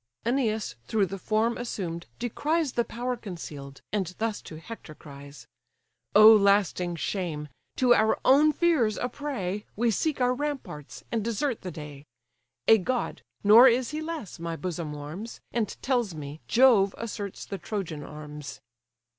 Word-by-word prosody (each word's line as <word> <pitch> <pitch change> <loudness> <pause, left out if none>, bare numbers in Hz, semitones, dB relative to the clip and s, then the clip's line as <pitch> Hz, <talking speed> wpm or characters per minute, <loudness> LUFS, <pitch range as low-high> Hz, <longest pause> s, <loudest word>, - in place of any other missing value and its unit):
Æneas 225 - 0
through 210 -3 +2
the 195 +1 -6
form 220 +4 0
assumed 175 -8 -4
descries 295 +6 0
The 235 - +2
power 245 +2 -3
conceal'd, 155 - -8
and 185 -4 -1
thus 225 -1 -2
to 155 - -10
Hector 165 -4 -10
cries: 140 -4 -12 0.7
"Oh 215 +1 +10
lasting 200 -4 +3
shame! 160 -4 -3 0.3
to 250 -2 +5
our 220 -2 +3
own 295 +4 +6
fears 300 - +2
a 245 - -1
prey, 235 -8 -4
We 235 +2 +2
seek 295 - 0
our 250 0 +3
ramparts, 270 - -5
and 230 -3 0
desert 235 +3 -1
the 185 - -5
day. 150 -3 -9 0.6
A 225 - +7
god, 245 +5 -2 0.2
nor 220 +5 +9
is 250 +1 +2
he 305 +1 -3
less, 315 - -6
my 165 0 -3
bosom 170 -3 -4
warms, 155 +10 -7
And 230 -3 0 0.2
tells 240 -9 0
me, 150 0 -8
Jove 230 -6 +5
asserts 205 -4 -5
the 195 - -6
Trojan 175 -7 -4
arms." 150 -1 -8
210 Hz, 150 wpm, -27 LUFS, 165-245 Hz, 0.7 s, Oh